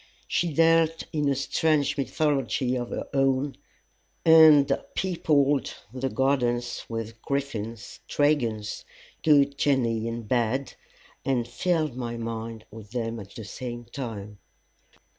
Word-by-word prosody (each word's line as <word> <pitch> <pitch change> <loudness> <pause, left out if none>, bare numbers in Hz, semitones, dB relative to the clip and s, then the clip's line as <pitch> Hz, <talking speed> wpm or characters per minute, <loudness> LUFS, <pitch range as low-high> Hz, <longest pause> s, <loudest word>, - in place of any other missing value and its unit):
She 170 -1 0
dealt 165 +1 +3
in 150 -2 +1
a 140 - +2
strange 145 +2 +1
mythology 135 -3 0
of 120 -1 -3
her - - -4
own, 135 0 +1 0.7
and 160 -3 +7 0.2
peopled 145 -7 +1 0.2
the 130 +1 -2
gardens 120 -3 0
with 115 0 -5
griffins, 115 -5 -4
dragons, 120 -8 0 0.4
good 140 -2 +4
genii 115 -5 +1
and 115 -1 -5
bad, 125 +3 0 0.5
and 125 -3 0
filled 155 0 0
my 120 -2 -4
mind 115 -1 -5
with 110 -2 -11
them 115 -2 -2
at 100 -1 -11
the 110 - -7
same 120 +3 -6
time. 110 -5 -7
130 Hz, 120 wpm, -26 LUFS, 115-145 Hz, 0.7 s, and